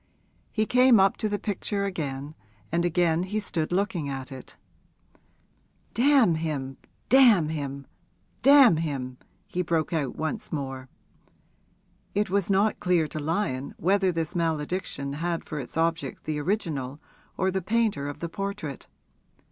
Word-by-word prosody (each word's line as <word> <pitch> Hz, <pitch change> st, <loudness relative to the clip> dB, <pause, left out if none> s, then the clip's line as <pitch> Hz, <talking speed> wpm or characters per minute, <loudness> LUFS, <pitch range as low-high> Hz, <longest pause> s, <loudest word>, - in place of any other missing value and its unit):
He 215 Hz, -1 st, +1 dB
came 250 Hz, -1 st, +5 dB
up 195 Hz, 0 st, +4 dB
to 215 Hz, -, -1 dB
the 205 Hz, -, -1 dB
picture 200 Hz, 0 st, -2 dB
again, 145 Hz, -6 st, -4 dB, 0.4 s
and 170 Hz, +1 st, +1 dB
again 175 Hz, -1 st, +2 dB
he 200 Hz, +4 st, -2 dB
stood 165 Hz, -6 st, -2 dB
looking 180 Hz, -5 st, 0 dB
at 135 Hz, 0 st, -5 dB
it. 130 Hz, -1 st, -10 dB, 1.4 s
'Damn 250 Hz, -, +5 dB
him 145 Hz, -5 st, -3 dB, 0.3 s
damn 235 Hz, -, +6 dB
him 140 Hz, -3 st, -4 dB, 0.6 s
damn 275 Hz, -, +7 dB
him!' 135 Hz, -6 st, -3 dB, 0.3 s
he 180 Hz, -, -2 dB
broke 165 Hz, -2 st, 0 dB
out 145 Hz, -6 st, -1 dB
once 155 Hz, 0 st, -4 dB
more. 135 Hz, -3 st, -4 dB, 1.3 s
It 205 Hz, -2 st, 0 dB
was 200 Hz, -1 st, +1 dB
not 200 Hz, +2 st, +2 dB
clear 175 Hz, -3 st, +2 dB
to 155 Hz, -, -5 dB
Lyon 150 Hz, -4 st, -2 dB
whether 190 Hz, +2 st, +2 dB
this 165 Hz, +1 st, -3 dB
malediction 160 Hz, -3 st, -2 dB
had 165 Hz, +3 st, -2 dB
for 150 Hz, -, -5 dB
its 130 Hz, +3 st, -7 dB
object 165 Hz, 0 st, -1 dB
the 155 Hz, -1 st, -2 dB
original 145 Hz, -6 st, -2 dB, 0.4 s
or 190 Hz, +1 st, +1 dB
the 190 Hz, 0 st, -1 dB
painter 210 Hz, -7 st, 0 dB
of 145 Hz, -, -8 dB
the 170 Hz, -, -2 dB
portrait. 195 Hz, -6 st, -5 dB
165 Hz, 140 wpm, -26 LUFS, 145-200 Hz, 1.4 s, damn